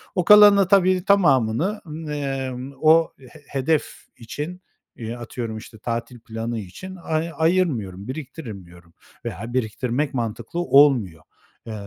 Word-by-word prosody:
O 180 - 0
kalanın 210 0 +8
da 195 -3 +3
tabii, 185 -1 +3
tamamını, 180 - +2
ımm, 160 0 -8
eee, 135 -3 -3 0.3
o, 160 +1 +4
he 135 +4 -15
hedef 145 +3 -2
için, 150 +10 -7 0.3
eee, 115 0 -6
atıyorum, 115 -1 -6
işte, 110 0 -11
tatil 115 +2 -4
planı 115 0 -5
için 185 - -9
ay 160 +1 -1
ayırmıyorum, 140 - 0
biriktirmiyorum 105 - -9 0.3
veya 115 +7 -6
biriktirmek 125 +4 -1
mantıklı 115 +5 -4
olmuyor. 130 - +3 0.4
Eee, 110 - -5
130 Hz, 125 wpm, -22 LUFS, 115-165 Hz, 0.4 s, kalanın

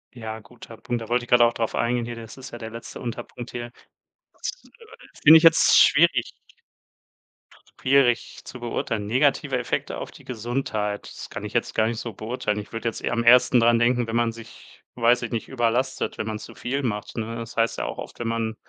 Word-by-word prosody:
Ja, 110 -1 -6
guter 115 -1 -14
Punkt. 120 -1 -3
Da 115 - -8
wollte 120 0 +1
ich - - -24
grad 120 -1 +5
auch 120 0 +5
drauf 115 -1 -2
eingehen 120 0 0
hier. 120 0 -6
Das 115 +2 -10
ist 130 - -10
ja 120 - -8
der 110 -1 -6
letzte 115 +1 -9
Unterpunkt 120 0 -6
hier. 120 0 -6 0.6
Das, - - -4
äh, 460 -2 -18
finde 155 +2 +10
ich 160 - +6
jetzt 165 -1 +6
schwierig 145 -5 +5 1.5
schwierig 130 -3 +2
zu 125 - -9
beurteilen. 115 -3 -3
Negative 135 +5 +2
Effekte - - -3
auf - - -7
die - - -16
Gesundheit, 110 -3 -3
das - - -9
kann - - -7
ich - - -6
jetzt - - 0
gar 110 - +3
nicht 115 0 -3
so 115 -3 -6
beurteilen. 110 -1 -3
Ich 105 - -9
würd' 115 0 -6
jetzt 115 - -2
eher - - -2
am 115 - 0
ehesten 125 +1 +6
dran 115 0 +4
denken, 120 0 +2
wenn 115 - -3
man 120 -1 +2
sich, 115 -1 -14
weiß 120 0 +3
ich 120 - -4
nicht, 115 - -3
überlastet, 120 0 -1
wenn 110 - -3
man 110 -1 -3
zu - - -11
viel 135 +3 -2
macht, 105 -4 -4
ne? 115 0 -3
Das 115 0 -8
heißt 115 0 +1
ja - - -2
auch - - -5
oft, - - -9
wenn 120 - -3
man 115 -1 -2
120 Hz, 220 wpm, -24 LUFS, 115-125 Hz, 1.5 s, finde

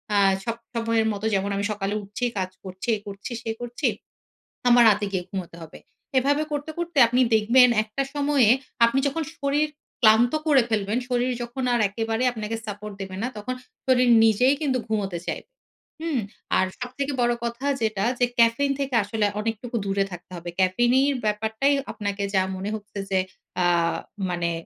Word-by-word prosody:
আ - - +4 0.3
সব 230 -1 -1 0.2
সময়ের 230 -1 +1
মতো 205 +1 -5
যেমন 195 0 +1
আমি 200 - -1
সকালে 200 -1 -2
উঠছি, 205 +5 -4
কাজ 185 -1 -1
করছি, 190 +3 -8
এই 205 - -8
করছি, 200 +4 -7
সেই 225 -1 -4
করছি। 240 0 -2 0.8
আমার 240 0 +7
রাতে 205 0 +2
গিয়ে 185 -2 -1
ঘুমুতে 185 -3 -6
হবে।" 160 -1 -11 0.4
এভাবে 285 +3 +2
করতে, 290 +1 -3
করতে 340 -2 -4
আপনি 245 +2 +2
দেখবেন 240 +4 +6
একটা 215 +6 -3
সময়ে 285 -5 +3 0.4
আপনি 235 +3 +1
যখন 320 +4 -2
শরীর 285 +2 +1 0.3
ক্লান্ত 225 +2 +5
করে 280 -4 +6
ফেলবেন, 210 0 0
শরীর 250 0 +1
যখন 240 +2 -5
আর 240 - +2
একেবারে 225 +3 -2
আপনাকে 220 -1 -4
support 210 0 -6
দেবে 190 -1 -6
না - - 0
তখন 255 +5 -4 0.3
শরীর 255 -1 +4
নিজেই 225 +5 +4
কিন্তু 270 -4 +1
ঘুমোতে 200 -5 -2
চাইবে। - - -4 0.5
হুম? 320 -5 -1 0.4
আর 185 - +3
সবথেকে 260 +3 -3
বড় 240 0 +3
কথা 235 +3 -4 0.2
যেটা 215 -2 0
যে, 245 - +5
caffeine 235 +5 +4
থেকে 275 -2 -1
আসলে 210 +1 -1
অনেকটুকু 225 +2 -4
দূরে 195 0 +1
থাকতে 175 +1 -10
হবে। 175 +1 -7
Caffeine 215 +7 +3
এর 280 - 0
ব্যাপারটাই 220 +6 +1 0.2
আপনাকে 200 -1 -3
যা 190 - +5
মনে 190 +2 -4
হচ্ছে 210 -1 -10
যে 190 - +3 0.4
অ্যা 180 -1 +3 0.6
মানে 175 -1 -1
225 Hz, 170 wpm, -24 LUFS, 200-255 Hz, 0.8 s, আমার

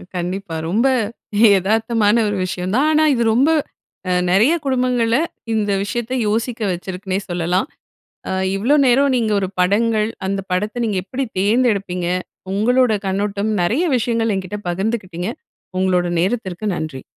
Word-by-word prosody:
கண்டிப்பா. 180 -1 -4
ரொம்ப 230 +8 +2 0.7
எதார்த்தமான 220 +2 +2
ஒரு 205 -1 -1
விஷயம்தான். 185 +11 0
ஆனா 310 0 +4
இது 235 -2 +1
ரொம்ப 270 +7 +3 0.6
அ - - +2 0.2
நிறைய 220 - +4
குடும்பங்கள்ல 250 -3 +1 0.4
இந்த 210 -2 0
விஷயத்த 240 +3 -3
யோசிக்க 225 +2 -1
வச்சிருக்குன்னே 185 +2 -3
சொல்லலாம். 175 - 0 0.6
அ - - -2 0.2
இவ்ளோ 240 +9 +2
நேரம் 270 +2 +4
நீங்க 225 -3 0
ஒரு 190 - -1
படங்கள், 215 +3 +2 0.2
அந்த 195 0 -1
படத்தை 210 +6 -1
நீங்க 205 -4 0
எப்படி 260 +7 -3
தேர்ந்தெடுப்பீங்க, 200 -4 +1 0.5
உங்களோட 245 +3 +3
கண்ணோட்டம், 200 +2 -1
நிறைய 245 - +1
விஷயங்கள் 230 -1 0
என்கிட்ட 190 +2 -4
பகிர்ந்துக்கிட்டிங்க. 190 -1 -3 0.5
உங்களோட 180 -1 +2
நேரத்திற்கு 190 -1 -2
நன்றி. 155 -5 -5
210 Hz, 125 wpm, -19 LUFS, 185-235 Hz, 0.7 s, ஆனா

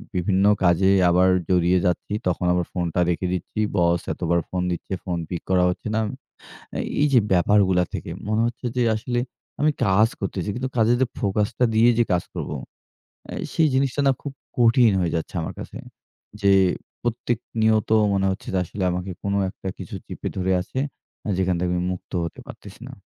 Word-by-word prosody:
বিভিন্ন 95 +2 +2 0.2
কাজে 90 +2 +4 0.2
আবার 90 +2 +4 0.2
জড়িয়ে 90 0 +3
যাচ্ছি। 90 +3 -1
তখন 90 0 0
আবার 90 -1 0
ফোনটা 90 -1 -1
রেখে 90 +1 0
দিচ্ছি। 90 +4 -4 0.2
বস 85 0 +3
এতবার 85 0 0
ফোন 90 -1 -2
দিচ্ছে। 90 +2 -4
ফোন 90 -2 -2
পিক 85 - -4
করা 90 -1 +4
হচ্ছে 90 - -4
না। - - +2 0.7
অ্যা - - -4 0.2
এইযে 140 -5 +5
ব্যাপারগুলা 95 0 +4
থেকে - - -5 0.2
মনে 110 +1 +1
হচ্ছে 120 +1 -7
যে 125 - +3
আসলে 120 +2 -2 0.4
আমি 155 0 +4
কাজ 100 +4 +4
করতেছি। 95 0 -3
কিন্তু 130 +1 -3
কাজের 115 +2 +4
যে 130 - +3
ফোকাসটা 105 +5 +1
দিয়ে 115 +2 +6
যে - - +6
কাজ 85 - +1
করব, - - -4 0.8
অ্যা - - -6 0.2
সেই 160 -1 +3
জিনিসটা 135 +1 +1
না - - +6
খুব 140 -2 -6 0.2
কঠিন 115 -1 +5
হয়ে 85 -2 0
যাচ্ছে 80 +3 -4
আমার 80 - -4
কাছে। - - -8 0.6
যে 100 0 +4 0.5
প্রত্যেক 120 0 -1 0.2
নিয়ত 110 -1 +3 0.2
মনে 95 0 +1
হচ্ছে 95 - -7
যে - - +2
আসলে 95 +3 -5
আমাকে 90 +1 -3
কোন 100 0 -1 0.2
একটা 95 - -9
কিছু - - -7
চিপে - - -6
ধরে 95 0 0
আছে। 130 +8 -5 0.5
আ - - -1
যেখান 95 -1 +1
থেকে 90 0 0
আমি 90 - -1
মুক্ত 90 - -10
হতে 85 - -6
পারতেছি - - -12
না। - - -9
95 Hz, 180 wpm, -23 LUFS, 90-115 Hz, 0.8 s, দিয়ে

